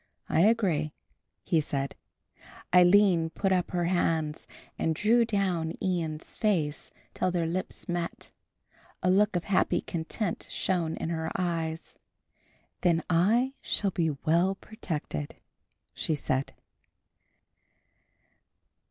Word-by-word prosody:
"I 160 - +2
agree," 180 -8 +2 0.5
he 165 -3 +2
said. 140 -2 -2 0.8
Aline 180 -2 +6
put 195 +3 -1
up 180 -2 +1
her 175 -1 -1
hands 165 -3 0 0.3
and 160 - 0
drew 230 +6 +4
down 185 -7 0
Ian's 165 -4 -2
face 165 -9 0 0.2
till - - 0
their 175 -2 0
lips 180 +3 -4
met. 175 -1 -4 0.7
A 185 - +4
look 205 +1 +3
of 175 - 0
happy 190 +3 +2
content 175 +4 -3
shone 170 -4 -1
in - - -3
her 160 -1 -2
eyes. 165 -2 -3 0.8
"Then 170 -2 +2
I 225 +10 +3
shall 200 -2 0
be 165 -2 +1
well 165 +6 +1
protected," 155 - -5 0.6
she 160 - -1
said. 135 -1 -1
175 Hz, 110 wpm, -28 LUFS, 160-190 Hz, 0.8 s, Aline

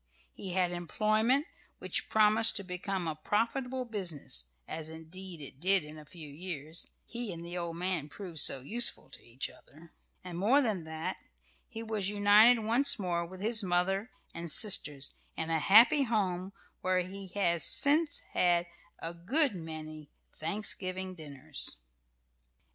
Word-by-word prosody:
He 190 -3 -7
had 180 -1 +1
employment 215 - 0 0.3
which - - -3
promised 220 +1 +4
to 200 - -2
become 180 0 -4
a 160 - -2
profitable 250 - -2
business 170 - -2 0.2
(as 160 0 -5
indeed 165 +2 -10
it 135 -1 -12
did 190 +1 +2
in 150 +1 -11
a 150 - -12
few 155 0 -10
years, 155 0 -6 0.2
he 235 -3 -5
and 170 -1 -8
the 175 +1 -7
old 170 -2 -4
man 175 -4 -2
proved 175 -1 -6
so 135 - +4
useful 230 - +2
to - - -10
each 120 +3 -4
other); 155 +3 -18 0.3
and, 175 -1 -7
more 235 +9 +4
than 215 - -1
that, 160 0 -4 0.5
he 225 - -8
was 215 -3 -2
united 210 +3 +5
once 235 +6 +4
more 175 -4 -2
with 185 +2 -11
his 225 +2 +4
mother 190 +3 -1 0.2
and 170 0 -6
sisters 150 -10 +6 0.3
in 160 0 -3
a 160 - +1
happy 225 - +6
home 195 -7 -1 0.3
where 185 0 +1
he 190 +2 -8
has 170 -4 +1
since 300 +2 +3
had 175 -1 +2 0.3
a 165 +1 -6
good 255 - +2
many 155 -3 -8 0.3
Thanksgiving 185 +1 -3
dinners. 150 -3 +2
185 Hz, 150 wpm, -30 LUFS, 160-215 Hz, 0.5 s, sisters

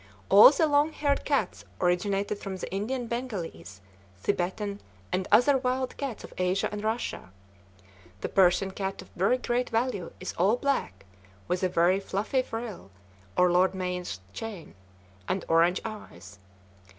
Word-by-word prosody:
All 205 +5 +10
the 310 +3 +2
long 295 +1 +3
haired 285 -2 0
cats 275 -10 0 0.2
originated 195 +3 0
from 195 -2 -5
the - - -5
Indian 240 +6 -2
Bengalese, 175 - -5 0.4
Thibetan, 200 - -2 0.3
and 185 0 -1
other 265 +3 +5
wild 255 0 -1
cats 270 -6 -4
of - - -11
Asia 185 +2 +1
and 210 0 -5
Russia. 220 - -3 0.9
The - - -3
Persian 190 +1 +3
cat 190 -1 -4
of - - -20
very 195 +8 +2
great 245 0 -1
value 225 -6 -1
is 185 - -5
all 195 +6 +4
black, 245 - -2 0.4
with 180 0 -1
a 185 - +2
very 180 +2 +3
fluffy 205 +6 -1
frill, 225 - -6 0.5
or 180 0 +5
lord 185 +2 +3
mayor's 180 - -4
chain, 210 - -7 0.5
and 190 - -2
orange 170 +3 +4
eyes. 100 - -9
195 Hz, 145 wpm, -28 LUFS, 180-240 Hz, 0.9 s, All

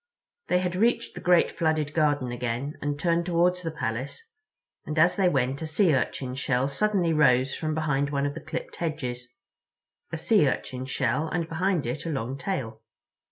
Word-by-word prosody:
They 180 - +3
had 180 0 -1
reached 230 +6 +1
the - - -8
great 180 -1 +4
flooded 155 -2 0
garden 145 -5 +1
again 125 +4 -3
and 145 0 -2
turned 170 +1 +1
toward 175 +1 +3
the 175 -2 -4
Palace, 140 - -4 0.6
and 155 - -5
as 165 +3 +5
they 190 -2 +3
went 135 -2 0
a 160 - -3
Sea 160 +1 +3
Urchin 130 0 -1
shell 130 0 0
suddenly 175 +3 +1
rose 135 -3 +4
from 155 -1 -2
behind 145 -3 0
one 140 -1 0
of 145 - -1
the - - -7
clipped - - -6
hedges—a 125 -1 -7
Sea 165 -2 +3
Urchin 130 -1 -3
shell 135 +3 0
and 165 0 -2
behind 175 -1 0
it 130 +7 -3
a - - -1
long 135 -3 -2
tail. 130 - -4
150 Hz, 175 wpm, -26 LUFS, 130-170 Hz, 0.6 s, as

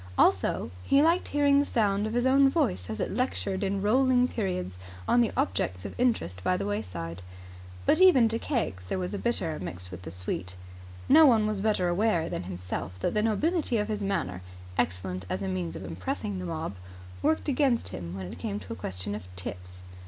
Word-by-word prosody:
Also 95 -3 +2
he 275 - +3
liked 335 +3 +3
hearing 285 -1 +4
the - - +4
sound 210 -5 +1
of 220 - -4
his 245 +1 +2
own 270 +1 +6
voice 95 - 0
as 110 - -4
it - - -2
lectured 205 -5 -1
in 195 0 -1
rolling 250 +3 +4
periods 90 - -3 0.3
on 240 - +5
the 230 - +2
objects 90 0 -1
of - - -5
interest 95 - 0
by 180 - +2
the 200 - -3
way 205 0 -1
side. 85 -1 -6 0.6
But - - +4
even 310 -11 +7
to 225 +1 -1
Keggs 220 - -2
there 90 - -2
was 180 +1 -3
a 200 - -2
bitter 180 -9 -1
mixed 90 0 -7
with 90 -1 -8
the 85 - -7
sweet. 90 +1 -4 0.5
No 310 +2 +8
one 225 -4 +5
was 215 -2 -1
better 205 -3 +1
aware 175 -2 +1
than 90 - -4
himself 90 0 -5
that - - 0
the 210 - +2
nobility 255 - +1
of 210 0 -1
his 210 -1 -2
manner, 165 - -2 0.3
excellent 90 +1 -1
as 95 +2 -2
a - - -2
means 90 -3 -3
of - - -6
impressing 90 +3 -3
the 90 - -5
mob, 85 +2 -3 0.5
worked 315 +1 +1
against 270 -4 +2
him 85 0 -6
when 95 - -5
it 90 - -8
came 100 +2 -3
to 95 - -7
a - - -6
question 95 +2 -5
of 105 -3 -6
tips. 90 0 -8
180 Hz, 205 wpm, -28 LUFS, -, 0.6 s, No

